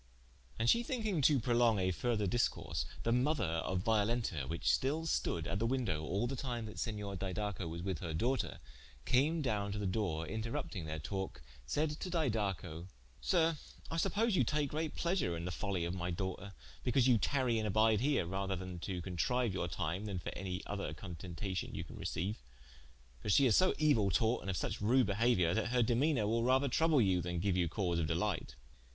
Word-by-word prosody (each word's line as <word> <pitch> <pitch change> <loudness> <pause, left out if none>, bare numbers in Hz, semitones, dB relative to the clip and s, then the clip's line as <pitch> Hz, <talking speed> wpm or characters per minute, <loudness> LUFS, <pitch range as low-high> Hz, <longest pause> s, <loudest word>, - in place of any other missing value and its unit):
And 115 - 0
she 235 - +5
thinking 220 - -1
to 140 0 +5
prolonge 120 -2 +3
a 95 0 +1
further 110 +2 0
discourse, 115 +5 0 0.2
the 115 - +1
mother 130 +2 +2
of 85 +2 -1
Violenta 110 - +1
which 85 - -4
stil 150 +4 0
stode 85 - 0
at 95 - -2
the 115 - +1
wyndowe 115 -12 0
al 100 +9 0
the 130 +3 -2
time 120 -3 -3
that 110 - -8
Senior 105 -3 -3
Didaco 95 -1 -3
was 85 +1 -5
with 95 -3 -2
her 85 - -4
doughter, 120 +10 0 0.5
came 150 +5 +2
downe 105 -5 0
to - - -3
the 105 - -2
doore, 90 -5 -1
interrupting 110 -3 -3
their 80 0 -3
talke, 95 -3 -4 0.2
saide 150 - 0
to 185 - -4
Didaco: 100 - -1 0.3
"Sir, 165 -4 +2 0.3
I 165 - -2
suppose 210 +5 +2
you - - +4
take 150 -2 0
great 155 0 -2
pleasure 170 - 0
in 85 - -5
the 90 - -2
follie 95 -2 -2
of 85 - -2
my 90 -1 -3
doughter, 95 +2 -4 0.3
because 125 0 +3
you 120 -4 +5
tarie 125 -4 +1
and 110 - -1
abide 110 +1 +4
here, 140 - +2
rather 95 +2 -2
to 90 0 -5
contriue 105 +6 0
your 90 -2 -1
tyme, 85 +4 -3
then 100 -3 -3
for 90 - -4
any 95 0 -4
other 100 -7 -4
contentacion 90 +3 -5
you - - -3
can - - -11
receiue. 95 +5 -2 0.9
For - - -5
she 135 +7 +6
is 120 - +5
so 185 0 +5
euill 120 -11 +3
taught, 115 +7 +2
and - - -5
of 90 - -1
suche - - -3
rude 125 +5 +4
behauiour, 100 -4 +2
that 110 +3 0
her 125 0 +3
demeanour 120 +1 +2
will 115 +2 +1
rather 130 +3 +3
trouble 160 0 +3
you, 95 -3 +2
than 90 0 -3
geue 100 +2 +1
you 90 -3 +1
cause 90 -2 0
of 80 - 0
delight." 85 +3 -1
105 Hz, 195 wpm, -35 LUFS, 90-125 Hz, 0.9 s, she